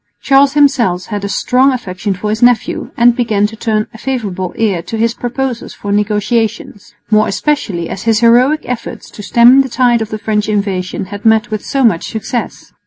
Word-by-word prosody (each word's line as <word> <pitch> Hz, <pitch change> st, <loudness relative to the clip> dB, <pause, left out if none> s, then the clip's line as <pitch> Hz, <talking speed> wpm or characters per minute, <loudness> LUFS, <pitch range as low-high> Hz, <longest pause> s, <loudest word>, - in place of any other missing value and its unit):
Charles 275 Hz, 0 st, +3 dB
himself 250 Hz, -11 st, +2 dB
had 205 Hz, -2 st, -5 dB
a 200 Hz, -, -3 dB
strong 255 Hz, +6 st, +2 dB
affection 200 Hz, -5 st, -4 dB
for 210 Hz, +3 st, -3 dB
his 220 Hz, -, -3 dB
nephew, 245 Hz, -1 st, +1 dB
and 240 Hz, 0 st, +4 dB
began 220 Hz, -5 st, +1 dB
to 220 Hz, +2 st, -4 dB
turn 215 Hz, -1 st, -1 dB
a 225 Hz, -, -12 dB
favourable 200 Hz, -9 st, -3 dB
ear 200 Hz, -6 st, 0 dB
to 225 Hz, -, -6 dB
his 230 Hz, +1 st, +1 dB
proposals 245 Hz, 0 st, -4 dB
for 205 Hz, -, -5 dB
negotiations, 210 Hz, +1 st, -2 dB, 0.2 s
more 215 Hz, 0 st, +4 dB
especially 205 Hz, -, -2 dB
as 190 Hz, -, -6 dB
his 225 Hz, -1 st, +1 dB
heroic 250 Hz, +6 st, +4 dB
efforts 245 Hz, -2 st, -6 dB
to -, -, -10 dB
stem 240 Hz, +5 st, +5 dB
the 265 Hz, -, -3 dB
tide 240 Hz, -2 st, +2 dB
of 220 Hz, -, -4 dB
French 210 Hz, 0 st, -1 dB
invasion 195 Hz, -3 st, -2 dB
had 205 Hz, -, -7 dB
met 220 Hz, 0 st, +2 dB
with 215 Hz, -1 st, -3 dB
so 275 Hz, -1 st, -1 dB
much 210 Hz, -9 st, +1 dB
success. 230 Hz, +2 st, -5 dB
225 Hz, 185 wpm, -14 LUFS, 205-245 Hz, 0.2 s, stem